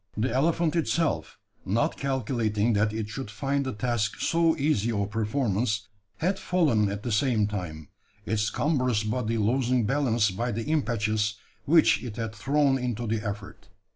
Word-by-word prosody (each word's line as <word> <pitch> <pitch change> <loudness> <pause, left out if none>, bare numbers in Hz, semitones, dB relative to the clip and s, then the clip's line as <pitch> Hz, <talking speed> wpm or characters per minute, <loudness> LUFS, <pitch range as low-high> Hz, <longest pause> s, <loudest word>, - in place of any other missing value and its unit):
The 115 +2 0
elephant 160 +4 +1
itself, 160 0 0 0.3
not 105 +5 0
calculating 120 -5 0
that 105 +1 +2
it 110 -1 -3
should 130 +1 -6
find 135 +6 -1
the 130 - -3
task 110 -1 -1
so 165 -1 +2
easy 135 -7 +1
of 100 -2 -1
performance, 110 -1 -1 0.3
had 190 +4 0
fallen 150 - +2
at 100 +1 -5
the 120 - -2
same 110 -1 +2
time 90 -7 -5 0.4
its 110 -1 0
cumbrous 125 -8 +1
body 115 +1 -1
losing 120 +2 +1
balance 120 -5 +2
by 120 +5 -2
the 115 +2 -2
impetus 110 -8 0 0.3
which 160 +2 +4
it 115 -4 -6
had 115 -2 -4
thrown 135 +5 +2
into 120 -2 -2
the 110 -1 -1
effort. 100 -2 -6
115 Hz, 155 wpm, -27 LUFS, 105-135 Hz, 0.4 s, which